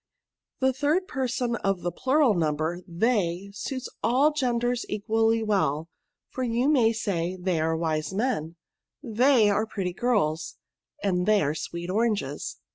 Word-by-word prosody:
The 260 Hz, 0 st, +3 dB
third 305 Hz, +8 st, +1 dB
person 245 Hz, -2 st, -1 dB
of 195 Hz, -4 st, -1 dB
the 175 Hz, -, -2 dB
plural 265 Hz, -, +3 dB
number, 160 Hz, 0 st, -1 dB
they, 190 Hz, -1 st, 0 dB
suits 260 Hz, +5 st, -5 dB
all 260 Hz, +7 st, +3 dB
the -, -, -15 dB
genders 245 Hz, -1 st, 0 dB
equally 225 Hz, +2 st, +1 dB
well; 170 Hz, -7 st, 0 dB, 0.4 s
for 260 Hz, -, -5 dB
you 240 Hz, +2 st, +1 dB
may 245 Hz, -7 st, +4 dB
say, 185 Hz, -5 st, -2 dB
they 180 Hz, -2 st, 0 dB
are 160 Hz, +1 st, 0 dB
wise 155 Hz, -1 st, -1 dB
men; 190 Hz, -7 st, -1 dB, 0.5 s
they 240 Hz, -2 st, +4 dB
are 215 Hz, +2 st, 0 dB
pretty 185 Hz, -4 st, -3 dB
girls; 165 Hz, -9 st, 0 dB, 0.5 s
and 180 Hz, -2 st, 0 dB
they 215 Hz, -2 st, +4 dB
are 145 Hz, 0 st, 0 dB
sweet 170 Hz, +2 st, -5 dB
oranges." 205 Hz, -, -1 dB
210 Hz, 145 wpm, -26 LUFS, 175-245 Hz, 0.5 s, may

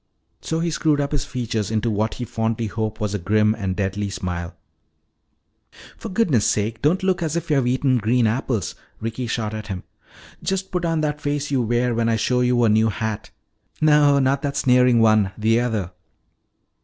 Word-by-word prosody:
So 160 Hz, 0 st, -2 dB
he 170 Hz, 0 st, 0 dB
screwed 150 Hz, -1 st, +1 dB
up 140 Hz, 0 st, -1 dB
his 145 Hz, -4 st, -1 dB
features 115 Hz, -5 st, -3 dB
into 110 Hz, +1 st, 0 dB
what 110 Hz, +1 st, -1 dB
he 125 Hz, -, -5 dB
fondly 115 Hz, 0 st, -2 dB
hoped 110 Hz, 0 st, -3 dB
was 105 Hz, -2 st, -2 dB
a 105 Hz, -, -1 dB
grim 105 Hz, +4 st, +2 dB
and 95 Hz, -4 st, -3 dB
deadly 100 Hz, +1 st, -2 dB
smile. 90 Hz, -3 st, -5 dB, 1.4 s
"For 225 Hz, -, -8 dB
goodness 180 Hz, -, +2 dB
sake, 110 Hz, +2 st, 0 dB
don't 165 Hz, +7 st, +2 dB
look 190 Hz, -2 st, +1 dB
as 160 Hz, -1 st, -1 dB
if 170 Hz, -1 st, -3 dB
you 145 Hz, -, +4 dB
had 130 Hz, -3 st, +1 dB
eaten 130 Hz, 0 st, +2 dB
green 115 Hz, +3 st, +2 dB
apples," 115 Hz, -, -1 dB, 0.3 s
Ricky 115 Hz, +2 st, -4 dB
shot 110 Hz, -1 st, -2 dB
at 110 Hz, -1 st, -6 dB
him. 95 Hz, -3 st, -5 dB, 0.6 s
"Just 190 Hz, 0 st, -2 dB
put 180 Hz, -1 st, -1 dB
on 165 Hz, -1 st, 0 dB
that 150 Hz, -1 st, -2 dB
face 145 Hz, 0 st, -2 dB
you 135 Hz, -3 st, +2 dB
wear 120 Hz, +1 st, +1 dB
when 115 Hz, 0 st, +1 dB
I 115 Hz, -, +2 dB
show 125 Hz, +3 st, +1 dB
you 125 Hz, -1 st, +2 dB
a -, -, +5 dB
new 110 Hz, +1 st, +3 dB
hat. 110 Hz, 0 st, -4 dB, 0.5 s
No, 150 Hz, -2 st, +5 dB
not 135 Hz, 0 st, +2 dB
that 140 Hz, -1 st, -2 dB
sneering 125 Hz, -3 st, +4 dB
one; 110 Hz, -3 st, +3 dB
the 115 Hz, +2 st, +2 dB
other." 110 Hz, -7 st, -2 dB
120 Hz, 190 wpm, -22 LUFS, 110-140 Hz, 1.4 s, a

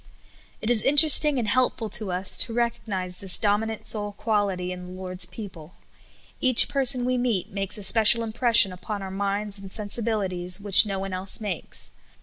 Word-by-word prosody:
It 220 Hz, -, -3 dB
is 230 Hz, -3 st, +2 dB
interesting 295 Hz, 0 st, +6 dB
and 235 Hz, -3 st, -3 dB
helpful 250 Hz, -1 st, -1 dB
to 210 Hz, -3 st, 0 dB
us 185 Hz, +2 st, 0 dB
to 230 Hz, -, +3 dB
recognize 215 Hz, -7 st, -5 dB
this 190 Hz, -2 st, +2 dB
dominant 215 Hz, +1 st, -3 dB
soul 205 Hz, -1 st, -2 dB
qualit} 205 Hz, -4 st, -3 dB
in 180 Hz, 0 st, -10 dB
the -, -, -12 dB
Lord's 185 Hz, -1 st, -1 dB
people. 180 Hz, -3 st, -12 dB, 0.7 s
Kach 255 Hz, -3 st, +4 dB
per 275 Hz, -1 st, -3 dB
son 255 Hz, -1 st, +1 dB
we 250 Hz, 0 st, -2 dB
meet 235 Hz, -7 st, -4 dB
makes 195 Hz, +1 st, -1 dB
a 205 Hz, -, -6 dB
special 225 Hz, +3 st, +4 dB
impression 225 Hz, -3 st, +3 dB
upon 200 Hz, +2 st, -8 dB
our 190 Hz, -, -9 dB
minds 200 Hz, +1 st, -5 dB
and 195 Hz, -1 st, -13 dB
sensibilities 200 Hz, -4 st, -2 dB
which 205 Hz, +1 st, +6 dB
no 195 Hz, -1 st, -5 dB
one 195 Hz, 0 st, -7 dB
else 185 Hz, +1 st, -2 dB
makes. 205 Hz, -7 st, -6 dB
205 Hz, 175 wpm, -22 LUFS, 190-230 Hz, 0.7 s, interesting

